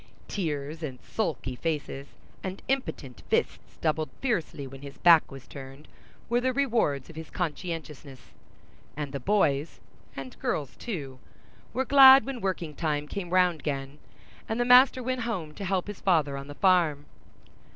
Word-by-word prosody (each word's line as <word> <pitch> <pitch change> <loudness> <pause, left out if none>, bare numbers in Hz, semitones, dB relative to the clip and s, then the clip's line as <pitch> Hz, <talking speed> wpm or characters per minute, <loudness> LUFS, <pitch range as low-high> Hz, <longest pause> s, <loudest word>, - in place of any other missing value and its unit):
Tears 155 -4 -3
and 135 -5 -5
sulky 155 - -3
faces, 145 -2 -3 0.4
and 190 0 -6
impotent 255 - -3
fists - - -1
doubled 155 -1 0
fiercely 170 - -2
when 135 0 -10
his 140 -1 -10
back 170 -2 +6
was 135 -2 -11
turned, 135 +1 -11 0.4
were 240 +1 +1
the 260 +1 +1
rewards 235 - +1
of 165 - -13
his 160 0 -8
conscientiousness; 155 -5 -5 0.7
and 145 -2 -4
the 140 - -4
boys—and 140 -5 -2
girls 145 -5 -2
too—were 135 - -7
glad 270 0 +9
when 265 -3 -5
working 180 -5 -2
time 150 -1 -2
came 180 +1 -5
round 180 -2 +3
again, 140 0 -4 0.5
and 220 +2 -1
the 240 - +2
master 255 +1 +6
went 255 0 -2
home 185 -10 -3
to 200 - -8
help 185 -1 0
his 205 -2 -8
father 155 -7 +2
on 140 0 -7
the 145 - -9
farm. 170 -7 +3
160 Hz, 150 wpm, -27 LUFS, 140-205 Hz, 0.7 s, glad